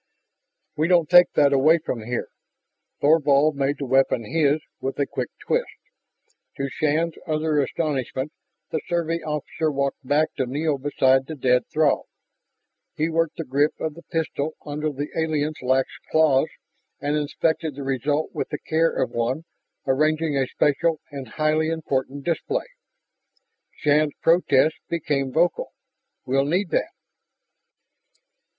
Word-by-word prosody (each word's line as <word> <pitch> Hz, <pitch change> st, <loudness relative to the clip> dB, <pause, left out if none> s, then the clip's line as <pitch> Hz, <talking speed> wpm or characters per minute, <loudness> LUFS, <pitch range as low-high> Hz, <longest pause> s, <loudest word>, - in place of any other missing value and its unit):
"We 155 Hz, +2 st, +1 dB
don't 175 Hz, -3 st, +3 dB
take 175 Hz, 0 st, +8 dB
that 140 Hz, -1 st, +4 dB
away 155 Hz, +5 st, +5 dB
from 130 Hz, -7 st, -4 dB
here." 120 Hz, +2 st, -3 dB, 0.7 s
Thorvald 150 Hz, -1 st, +4 dB
made 140 Hz, +1 st, 0 dB
the 140 Hz, -, -4 dB
weapon 130 Hz, -2 st, +2 dB
his 150 Hz, +3 st, +2 dB, 0.2 s
with 135 Hz, -, -4 dB
a 140 Hz, -, +1 dB
quick -, -, -4 dB
twist. -, -, -1 dB, 0.9 s
To 140 Hz, -, -1 dB
Shann's 155 Hz, +4 st, 0 dB
utter 155 Hz, -1 st, +1 dB
astonishment, 135 Hz, -1 st, -2 dB, 0.4 s
the 160 Hz, -, -1 dB
Survey 170 Hz, -1 st, 0 dB
officer 155 Hz, +1 st, -2 dB
walked 140 Hz, 0 st, -2 dB
back 145 Hz, +4 st, +1 dB
to 130 Hz, -, 0 dB
kneel 145 Hz, +2 st, -1 dB
beside 135 Hz, -1 st, +2 dB
the 160 Hz, -, -5 dB
dead 125 Hz, -2 st, +2 dB
Throg. 155 Hz, -2 st, +2 dB, 0.9 s
He 155 Hz, +2 st, 0 dB
worked 165 Hz, 0 st, 0 dB
the 165 Hz, -, -3 dB
grip 145 Hz, +2 st, +1 dB
of 160 Hz, -1 st, -2 dB
the 170 Hz, -, -12 dB
blaster 160 Hz, -3 st, -1 dB, 0.2 s
under 150 Hz, +1 st, -2 dB
the 145 Hz, +1 st, -4 dB
alien's 155 Hz, -1 st, -1 dB
lax 130 Hz, +1 st, +2 dB, 0.2 s
claws 155 Hz, -2 st, +4 dB, 0.5 s
and 145 Hz, +1 st, -1 dB
inspected 155 Hz, 0 st, -1 dB
the 140 Hz, -, -6 dB
result 135 Hz, +3 st, -1 dB
with -, -, -3 dB
the 150 Hz, -, -3 dB
care 165 Hz, +2 st, +1 dB
of -, -, -1 dB
one 120 Hz, +6 st, -1 dB, 0.4 s
arranging 155 Hz, +3 st, +1 dB
a 135 Hz, -2 st, +1 dB
special 155 Hz, +4 st, +1 dB
and 135 Hz, -3 st, -7 dB
highly 155 Hz, +5 st, +1 dB
important 140 Hz, -3 st, -2 dB
display. 415 Hz, -, -1 dB, 1.1 s
Shann's 150 Hz, 0 st, +2 dB
protest 160 Hz, -3 st, +4 dB
became 145 Hz, -5 st, -1 dB
vocal. 165 Hz, +3 st, +1 dB, 0.5 s
"We'll 135 Hz, +2 st, +2 dB
need 175 Hz, +4 st, 0 dB
that!" -, -, +1 dB
150 Hz, 140 wpm, -24 LUFS, 135-160 Hz, 1.1 s, take